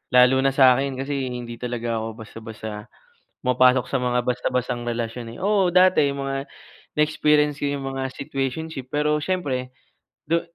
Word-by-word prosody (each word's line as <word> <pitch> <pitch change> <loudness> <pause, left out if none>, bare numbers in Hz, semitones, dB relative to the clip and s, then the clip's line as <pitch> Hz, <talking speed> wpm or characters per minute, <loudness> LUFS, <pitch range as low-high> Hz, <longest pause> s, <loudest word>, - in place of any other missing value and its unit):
Lalo 125 +1 +6
na 135 - +3
sa 130 -2 +7
akin 135 +1 -1
kasi 135 -1 -2
hindi 120 -1 -6
talaga 120 -2 -2
ako 110 - -3 0.2
basta-basta 110 -1 -8 0.6
pumapasok 125 0 +4
sa 135 - +1
mga 125 0 +1
basta-bastang 125 -1 -1
relasyon, 115 0 -4
eh. - - -12
Oo, 200 -2 +3
dati 185 -5 +5
mga 135 0 -3 0.5
na-experience 150 -1 +3
ko 145 - 0
yung 135 -1 -4
mga 135 0 -2
situationship 135 0 -4
pero 150 +1 +1
siyempre, 140 -8 -2 0.6
du 170 +1 +2
130 Hz, 150 wpm, -23 LUFS, 125-145 Hz, 0.6 s, sa